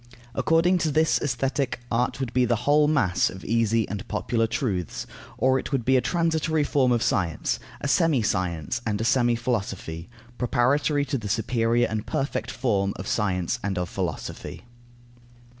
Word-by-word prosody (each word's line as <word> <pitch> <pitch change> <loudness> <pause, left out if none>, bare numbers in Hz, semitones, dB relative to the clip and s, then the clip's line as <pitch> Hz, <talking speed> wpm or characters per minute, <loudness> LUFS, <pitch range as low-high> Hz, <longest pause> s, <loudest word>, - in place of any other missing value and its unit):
According 170 +6 +3
to 160 - +1
this 155 +2 +2
Aesthetic, 135 0 -1
art 125 +3 0
would 130 -3 -3
be 125 - +3
the 120 -1 +2
whole 150 +1 +5
mass 135 -13 +2
of 95 - -10
easy 115 -1 +1
and 100 0 -6
popular 115 +3 0
truths; 110 - -2 0.3
or 130 0 +3
it - - -6
would 130 -5 -1
be 130 - +4
a 130 - +4
transitory 160 -2 +1
form 135 -3 +2
of 120 -1 +2
science, 90 - 0 0.2
a - - -2
semi 150 -5 +3
science 90 0 -1
and 105 -3 -1
a - - -1
semi 120 -1 +3
philosophy, 100 -8 -3 0.3
preparatory 140 +4 +2
to 140 -2 -2
the 105 -2 -6
superior 115 +2 +1
and 110 -1 -4
perfect 140 -2 -2
form 100 -6 0
of 95 - -7
science 95 0 0
and 100 -2 -2
of 90 -1 -2
philosophy. 90 -5 -5
120 Hz, 165 wpm, -25 LUFS, 105-140 Hz, 0.3 s, whole